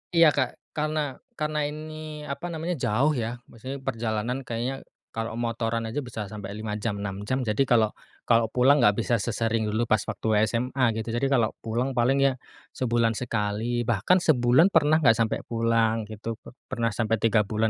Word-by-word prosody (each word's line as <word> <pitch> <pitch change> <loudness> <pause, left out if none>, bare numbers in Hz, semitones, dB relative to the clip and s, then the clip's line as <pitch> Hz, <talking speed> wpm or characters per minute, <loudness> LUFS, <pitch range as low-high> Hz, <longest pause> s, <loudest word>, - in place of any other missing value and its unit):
Iya 165 -1 +7
Kak - - +1 0.2
karena 155 0 -1 0.4
karena 150 0 -1
ini 155 0 -7
apa 145 +5 -5
namanya 165 +2 -3
jauh 135 +9 +2
ya 120 -1 -3
maksudnya 130 +4 -7
perjalanan 120 -1 -2
kayaknya, 125 +2 -3 0.3
kalau 115 0 -4
motoran 115 -1 -1
aja 145 +6 -2
bisa 110 -3 -5
sampai 105 -2 -7
5 110 -1 -4
jam 105 -1 -2
6 100 -2 -3
jam 130 0 0
jadi 105 +4 0
kalau 115 -4 +3 0.4
kalau 115 -1 +5
pulang 130 +4 +4
nggak 105 -3 +5
bisa 120 +1 +1
sesering 115 0 0
dulu 110 +3 0
pas 110 -3 +3
waktu - - -4 0.2
SMA 125 +3 -1
gitu 110 - -4
jadi 135 - +1
kalau 120 -5 +3 0.2
pulang 120 +4 -1
paling 130 +3 +3
ya, 135 - +3 0.4
sebulan 115 -2 +2
sekali 115 0 -1
bahkan 115 - +3
sebulan 135 +3 +4
pernah 155 +2 +5
nggak 115 -4 +5
sampai 115 -1 +1
pulang 115 -1 +1
gitu 110 +1 -5 0.3
pernah 120 -3 0
sampai 115 +1 0
3 110 0 +2
120 Hz, 170 wpm, -26 LUFS, 110-135 Hz, 0.4 s, Iya